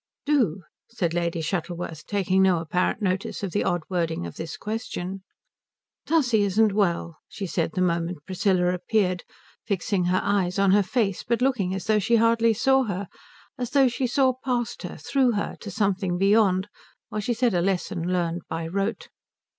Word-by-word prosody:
"Do," 235 - +1 0.3
said 185 -8 -1
Lady 170 -1 -1
Shuttleworth, 170 -1 -4
taking 190 -2 +1
no 190 -2 +4
apparent 180 +6 -1
notice 190 +1 -1
of 195 - -2
the 205 - 0
odd 175 -2 0
wording 165 - -1
of 85 - -7
this 160 - -6
question. 195 -4 -4 0.9
"Tussie 250 -9 +3
isn't 205 +1 +3
well," 170 -5 0
she 200 - -6
said 165 -2 -1
the 185 - +1
moment 170 -2 -1
Priscilla 185 -1 +1
appeared, 185 -1 0 0.4
fixing 200 -2 -1
her 185 +1 +2
eyes 195 -3 +1
on 195 -1 +4
her 205 +1 +5
face 200 -1 0
but 235 0 0
looking 205 -9 +1
as 190 - -5
though 215 -1 +3
she 220 +4 +2
hardly 230 0 +4
saw 265 +4 +3
her, 200 -2 -4 0.5
as 245 -2 -2
though 270 0 +4
she 250 +1 -1
saw 260 +1 +3
past 245 -3 -1
her, 180 - -7
through 250 - +1
her, 205 - -2
to 205 - -7
something 195 -2 0
beyond, 195 -1 +3 0.4
while 215 - -3
she 235 +3 -1
said 240 -1 +2
a 175 - +2
lesson 180 -1 -1
learned 175 -1 -1
by 165 0 -3
rote. 195 +6 -2
195 Hz, 175 wpm, -25 LUFS, 180-225 Hz, 0.9 s, her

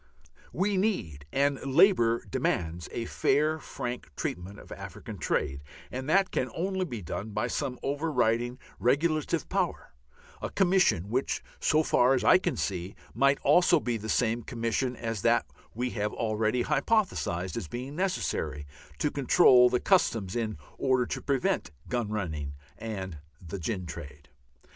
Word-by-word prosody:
We 195 +3 0
need, 95 - -1
and 140 0 +1
Labour 130 - +4
demands, 85 0 -1
a 115 - -3
fair, 155 +6 +1
frank 120 - -5
treatment 95 +4 -4
of - - -14
African - - -8
trade, 70 +1 -1 0.3
and 130 +3 -4
that 190 +2 +3
can 130 - -1
only 190 +2 -1
be 120 - -6
done 105 +6 -5
by 105 - 0
some 125 -1 -2
overriding 125 -5 0 0.2
regulative 155 +5 +1
power, - - -2 0.5
a - - -3
Commission 180 - +2
which, 130 +3 -1 0.2
so 155 0 +3
far 130 -2 +4
as 130 - -1
I - - +7
can 175 -2 -2
see, 90 -1 -3 0.2
might 140 +3 +3
also 170 +3 +5
be 120 -4 -1
the 110 0 -5
same 115 0 +1
Commission 115 +2 -1
as 115 -4 -4
that 120 +1 +3 0.3
we 125 +2 -1
have 105 -1 -2
already 110 +2 0
hypothesized 140 - 0
as - - -4
being 125 - -6
necessary 80 - -1 0.3
to 150 - 0
control 130 -3 +6
the 125 - +1
Customs 115 - +2
in 110 -3 -2 0.2
order 130 -2 +2
to - - -4
prevent 135 -3 0 0.2
gun 120 -4 -1
running 80 -9 -3 0.2
and 95 -7 -5 0.2
the 90 +2 -7
gin 90 +2 -3
trade. 75 -2 -9
120 Hz, 150 wpm, -29 LUFS, 100-145 Hz, 0.5 s, I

